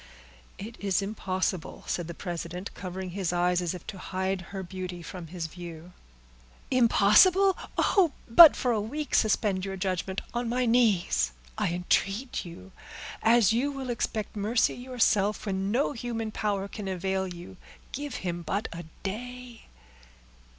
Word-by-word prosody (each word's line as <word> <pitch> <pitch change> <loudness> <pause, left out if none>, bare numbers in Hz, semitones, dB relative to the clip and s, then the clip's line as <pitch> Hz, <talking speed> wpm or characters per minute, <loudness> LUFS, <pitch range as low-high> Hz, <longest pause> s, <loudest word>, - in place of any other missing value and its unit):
"It 225 +4 -8
is 200 -1 0
impossible," 185 -4 -3
said 175 -2 -2
the 170 - -7
president, 175 +1 -5
covering 185 0 -6
his 185 -2 -2
eyes, 180 0 +2
as 175 0 -2
if 180 - -10
to 195 - -7
hide 190 0 -2
her 195 -1 -5
beauty 180 -1 -6
from 175 0 -8
his 170 0 -5
view. 170 +1 -9 0.8
"Impossible! 260 - +5 0.2
oh! 365 -6 +4 0.2
but 305 +7 +10
for 250 - 0
a 220 -3 +1
week 290 +7 -5
suspend 205 -3 +2
your 195 0 -4
judgment. 190 0 -2
On 240 0 -1
my 250 +1 +1
knees 205 - +2 0.2
I - - 0
entreat 195 +7 0
you, 180 +2 -11 0.5
as 225 -2 +5
you 265 +5 +1
will 270 -3 -4
expect 220 -2 -3
mercy 215 +3 +2
yourself, 220 -5 +1
when 195 -1 -1
no 250 +7 +1
human 230 -3 -4
power 200 -2 -1
can 205 0 -7
avail 190 +1 -1
you, 180 +2 -10 0.3
give 290 +1 -5
him 175 -1 -2
but 190 +6 -2
a 170 0 -7 0.2
day." 245 +4 -6
195 Hz, 150 wpm, -28 LUFS, 180-235 Hz, 0.8 s, but